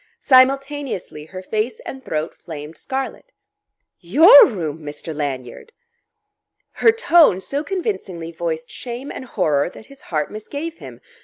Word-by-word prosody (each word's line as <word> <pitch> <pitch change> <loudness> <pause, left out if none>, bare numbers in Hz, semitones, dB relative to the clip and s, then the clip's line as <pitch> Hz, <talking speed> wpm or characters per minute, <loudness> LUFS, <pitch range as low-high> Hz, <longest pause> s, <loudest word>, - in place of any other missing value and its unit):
Simultaneously 270 - +2
her 185 +3 -9
face 215 +4 -2
and 265 0 -8
throat 155 -4 -3
flamed 155 -1 -9
scarlet. 270 - -5 0.7
"Your 285 - +8
room, 165 - -4
Mr. 150 +1 -7
Lanyard!" 140 - -5 1.0
Her 450 - +4
tone 345 - +4
so 280 +9 -3
convincingly 310 - -4
voiced 160 -1 -4
shame 250 +3 -7
and - - -7
horror 155 - 0
that 215 - -14
his 275 - -16
heart 155 -3 -1
misgave 285 +10 -6
him. - - -11
215 Hz, 130 wpm, -20 LUFS, -, 1.0 s, Your